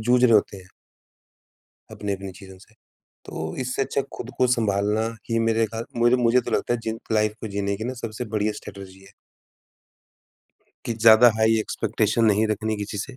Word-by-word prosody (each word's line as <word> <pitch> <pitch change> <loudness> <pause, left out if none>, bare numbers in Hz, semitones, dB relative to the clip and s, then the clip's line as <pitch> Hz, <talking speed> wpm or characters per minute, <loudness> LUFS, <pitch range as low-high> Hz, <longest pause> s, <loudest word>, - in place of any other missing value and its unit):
जूझ 120 +3 +2
रहे 115 - +5
होते 100 -1 +3
हैं। 90 -1 -14 1.2
अपनी-अपनी 100 -2 -5
चीज़ों 95 0 -13
से। 110 +3 -20 0.5
तो 80 0 -6
इससे 130 +1 -1
अच्छा 135 - -1 0.2
खुद 120 - -7
को 130 - +4
सँभालना 105 0 0 0.2
ही 115 - +1
मेरे 115 0 +2
खाल 115 +2 -6 0.2
मेरे 120 +2 +5
मुझे 120 0 +3
तो 120 - -7
लगता 120 - 0
है 120 - -4
जिन 110 0 -4
लाइफ 105 -1 +1
को 110 - -5
जीने 100 0 -1
की 110 - -6
ना 130 - -3
सबसे 115 +2 -5
बढ़िया 105 0 +1
स्ट्रेटेजी 95 -2 -11
है। - - -18 1.7
कि 115 - -1
ज़्यादा 115 +1 +7
हाई 110 0 +3
एक्सपेक्टेशन 115 +1 0
नहीं 110 0 +3
रखने 110 +1 -1
किसी 105 0 -5
से। 130 +5 -6
110 Hz, 180 wpm, -23 LUFS, 100-115 Hz, 1.7 s, ज़्यादा